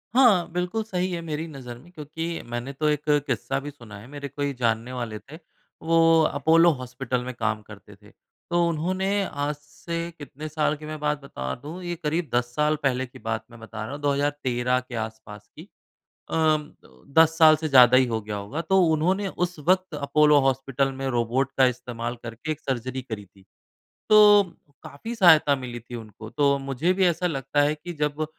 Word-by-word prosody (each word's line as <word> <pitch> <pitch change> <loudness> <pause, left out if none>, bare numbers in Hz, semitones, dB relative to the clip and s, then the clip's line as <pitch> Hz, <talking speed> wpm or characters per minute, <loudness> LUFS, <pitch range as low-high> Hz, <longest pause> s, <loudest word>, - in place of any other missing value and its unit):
हाँ 195 -10 +5
बिल्कुल, 180 +6 -2
सही 185 -3 -2
है 170 -1 -3
मेरी 155 +1 -3
नज़र 125 -5 -9
में 170 +8 -18
क्योंकि 155 0 -6 0.2
मैंने 120 +3 -4
तो 150 +2 0
एक 150 0 -2 0.2
किस्सा 135 +2 -1
भी 145 +1 -7
सुना 115 -7 -12
है। 115 - -13
मेरे 145 0 -7
कोई 140 0 -3
जानने 115 0 -1
वाले 115 -4 -4
थे 145 +9 -13 0.5
वो 165 0 +4
अपोलो 160 +4 +4
हॉस्पिटल 125 0 -3
में 130 0 -5
काम 110 -2 -1
करते 105 -1 -14
थे। 105 +1 -20 0.4
तो 175 0 +2
उन्होंने 185 +4 -1 0.2
आज 145 -3 -3
से 150 +3 -7 0.2
कितने 150 +1 -8
साल 155 0 0
की 155 - -10
मैं 155 0 -6
बात 150 -1 -1
बता 65 - -5
दूँ 165 +5 -7
ये 175 0 -3
करीब 160 +2 -1
10 120 0 0
साल 150 0 +2
पहले 130 -1 +1
की 125 - -15
बात 110 -1 -3
मैं 120 - -13
बता 110 -1 -7
रहा 110 - -6
हूँ 145 - -7
2013 140 -3 0
के 125 -1 -9
आस-पास 110 -1 -10
की। - - -10 0.7
अ, - - -3 0.8
10 160 0 +6
साल 155 -1 +7
से 155 0 -3
ज़्यादा 130 -2 +7
ही 130 -1 +5
हो 110 -2 -2
गया 105 0 -5
होगा। 100 +11 -5
तो 190 +3 +3
उन्होंने 180 +6 +1
उस 180 -2 -3
वक़्त 185 +2 +1
अपोलो 150 +1 +4
हॉस्पिटल 135 0 0
में 135 - -2
रोबोट 125 +4 0
का 130 - +7
इस्तेमाल 120 0 -6
करके 120 +6 -6
एक 155 - -9
सर्जरी 130 0 -3
करी 110 -5 -7
थी, 95 0 -23 0.7
तो 210 -1 +8 0.4
काफ़ी 225 +12 -7
सहायता 160 -8 +6
मिली 125 -2 -7
थी 120 +1 -10
उनको। 110 -1 -10
तो 140 0 +2
मुझे 160 +8 +1
भी 190 0 +2
ऐसा 175 +1 +1
लगता 140 -1 0
है 150 +1 +2
कि 175 +3 -8
जब 150 +1 -1
145 Hz, 190 wpm, -25 LUFS, 120-160 Hz, 0.8 s, तो